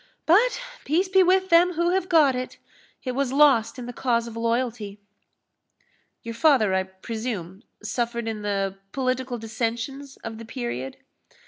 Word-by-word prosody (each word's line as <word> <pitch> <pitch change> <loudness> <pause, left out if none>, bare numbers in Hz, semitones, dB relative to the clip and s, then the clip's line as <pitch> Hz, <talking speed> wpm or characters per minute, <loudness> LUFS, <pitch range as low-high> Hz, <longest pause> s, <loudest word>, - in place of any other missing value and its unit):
But 440 +10 +4 0.2
peace 345 +6 +1
be 380 0 +5
with 375 +1 +3
them 345 +2 +5
who 345 +1 +1
have 375 0 0
got 300 -6 +5
it! 255 0 -5 0.5
it 255 - -2
was 265 0 -1
lost 270 -6 +4
in 250 - -6
the 245 - -7
cause 235 -2 0
of 230 -1 -8
loyalty." 230 -3 -2 1.2
"Your 230 -1 -5
father, 230 -6 +3
I 190 - +2
presume, 190 -1 -6 0.2
suffered 235 -1 -2
in 220 -1 -3
the 195 -1 -2
political 255 -1 -1
dissensions 235 +5 -4
of 225 -1 -6
the 230 - -8
period?" 225 - -5
245 Hz, 150 wpm, -25 LUFS, 225-285 Hz, 1.2 s, be